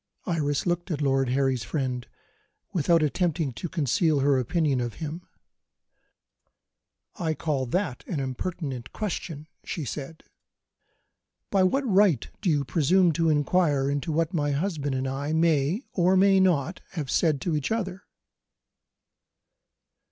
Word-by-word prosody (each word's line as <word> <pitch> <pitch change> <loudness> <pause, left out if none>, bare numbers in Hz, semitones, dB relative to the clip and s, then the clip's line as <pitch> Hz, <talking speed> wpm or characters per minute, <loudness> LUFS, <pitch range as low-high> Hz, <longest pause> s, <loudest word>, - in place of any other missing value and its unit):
Iris 145 -5 0
looked 175 +1 -1
at 155 -5 -2
Lord 135 -3 +1
Harry's 130 -2 +1
friend 125 +1 -3 0.7
without 165 -1 +3
attempting 160 -2 0
to 175 +8 -5
conceal 155 -1 +1
her 140 -1 +3
opinion 140 0 +1
of 120 -2 -4
him. 165 +3 -6 1.9
"I 160 -2 -1
call 140 -4 -1
that 160 -2 -2
an 160 - -2
impertinent 135 -2 -4
question," 170 -7 -4 0.2
she 160 - -4
said. 150 +4 -6 1.3
"By 195 - +3
what 265 +9 +2
right 190 - +3
do 200 - +1
you 145 -3 +1
presume 175 +4 +3
to 165 +1 +1
inquire 145 -2 +2
into 145 +4 -2
what 165 +3 0
my 145 -3 0
husband 145 -3 -1
and 130 0 -1
I 140 +3 -2
may, 160 - +2
or 185 +1 +3
may 195 0 +5
not, 180 -2 +1
have 150 -8 -4
said 155 -5 +2
to 170 -4 -1
each 150 +4 -2
other?" 195 -4 -2
155 Hz, 135 wpm, -26 LUFS, 140-175 Hz, 1.9 s, may